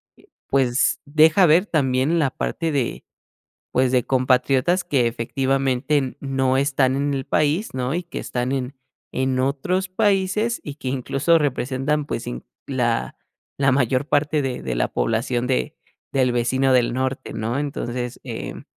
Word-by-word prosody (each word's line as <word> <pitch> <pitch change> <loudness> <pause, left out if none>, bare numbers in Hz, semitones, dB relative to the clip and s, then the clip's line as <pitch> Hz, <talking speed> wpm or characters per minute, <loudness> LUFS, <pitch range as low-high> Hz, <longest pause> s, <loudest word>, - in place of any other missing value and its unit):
eh, - - -23 0.2
pues 135 0 +2
deja 155 +5 +5
ver 165 +5 +5
también 140 -2 +1
la 150 -5 +2
parte 165 +3 -2
de, 135 -5 -2 0.7
pues, 130 0 +2
de 125 -1 +3
compatriotas 130 +6 +2
que 130 -7 +1
efectivamente 135 +4 0
n 130 -2 -3
no 135 -2 0
están 135 -1 +2
en 140 +1 0
el 135 -1 -3
país, 155 - 0
¿no? 130 +2 -2
Y 175 - -1
que 175 - -7
están 125 0 -3
en 135 0 -2 0.4
en 130 0 0
otros 145 +8 0
países 205 +3 +1
y 145 - -6
que 140 -3 -6
incluso 135 +5 +2
representan, 140 +1 -1
pues - - -4
inc - - -6 0.2
la 120 -4 -1 0.4
la 135 -1 +3
mayor 130 +1 +1
parte 150 +1 +1
de 130 -2 -3
de 65 -1 -3
la - - 0
población 120 +2 -1
de 130 0 -1 0.3
del 130 -2 +2
vecino 130 +3 +1
del 125 -2 +3
norte, 130 0 -2
¿no? 115 +4 -2
Entonces, 125 -4 -4
em, - - -6
135 Hz, 155 wpm, -22 LUFS, 125-150 Hz, 0.7 s, deja